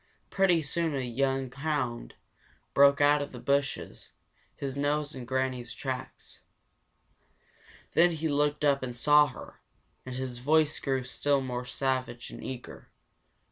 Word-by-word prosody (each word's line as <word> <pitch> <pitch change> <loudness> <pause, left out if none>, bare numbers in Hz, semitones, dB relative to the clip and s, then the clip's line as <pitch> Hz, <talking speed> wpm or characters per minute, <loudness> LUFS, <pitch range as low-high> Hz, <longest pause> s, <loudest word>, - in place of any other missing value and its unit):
Pretty 180 -4 +3
soon 160 +2 -1
a 135 - -1
young 135 +1 -1
hound 130 - -3 0.6
broke 140 0 +6
out 145 0 +5
of 145 - -5
the 125 - -7
bushes, 140 +2 -2 0.4
his 135 -1 -4
nose 145 +1 0
in 130 -2 -7
Granny's 130 -1 -2
track. 130 -2 -5 1.7
Then 175 +1 +6
he 160 -1 -2
looked 150 0 +1
up 140 -1 +3
and 125 -2 -5
saw 150 +4 +5
her, - - -11 0.4
and 130 -1 -7
his 130 -2 -4
voice 155 +3 +2
grew 135 -2 -1
still 140 +2 +1
more 125 -2 -4
savage 130 -2 -2
and - - -9
eager. 130 -2 -8
140 Hz, 140 wpm, -29 LUFS, 130-145 Hz, 1.7 s, broke